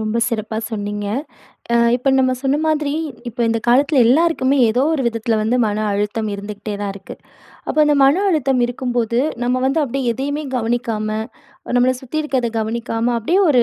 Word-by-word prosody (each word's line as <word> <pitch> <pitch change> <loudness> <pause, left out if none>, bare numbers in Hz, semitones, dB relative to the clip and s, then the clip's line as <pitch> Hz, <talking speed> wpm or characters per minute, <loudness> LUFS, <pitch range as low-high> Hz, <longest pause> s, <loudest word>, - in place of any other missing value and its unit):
ரொம்ப 220 +1 -1
சிறப்பா 220 -2 -3
சொன்னீங்க. 205 -2 -4 0.7
அ - - +5 0.2
இப்ப 255 +2 -2
நம்ம 260 -1 +3
சொன்ன 275 +1 +1
மாதிரி, 300 -2 0 0.4
இப்ப 235 - -12
இந்த 230 0 +1
காலத்தில 275 +3 +4
எல்லாருக்குமே 280 -1 +3
ஏதோ 245 +4 +1
ஒரு 275 - -1
விதத்தில 230 -1 0
வந்து 235 +3 +1
மன 210 0 -2
அழுத்தம் 210 +2 -1
இருந்துகிட்டே 205 +1 -6
தான் 200 -1 -2
இருக்கு. 195 -1 -10 0.5
அப்போ - - -2
அந்த 295 - +3
மன 310 +9 +4
அழுத்தம் 270 -7 +1
இருக்கும்போது, 240 -1 -1 0.2
நம்ம 250 +1 0
வந்து 275 +4 +1
அப்படியே 265 -2 -1
எதையுமே 285 +5 -3
கவனிக்காம, 225 -2 -1 0.7
நம்மள 250 +1 +4
சுத்தி 270 +4 -4
இருக்கத 260 -5 -1
கவனிக்காம 230 +1 -1
அப்படியே 335 - +1
ஒரு 250 -5 +5
245 Hz, 165 wpm, -19 LUFS, 220-270 Hz, 0.7 s, அ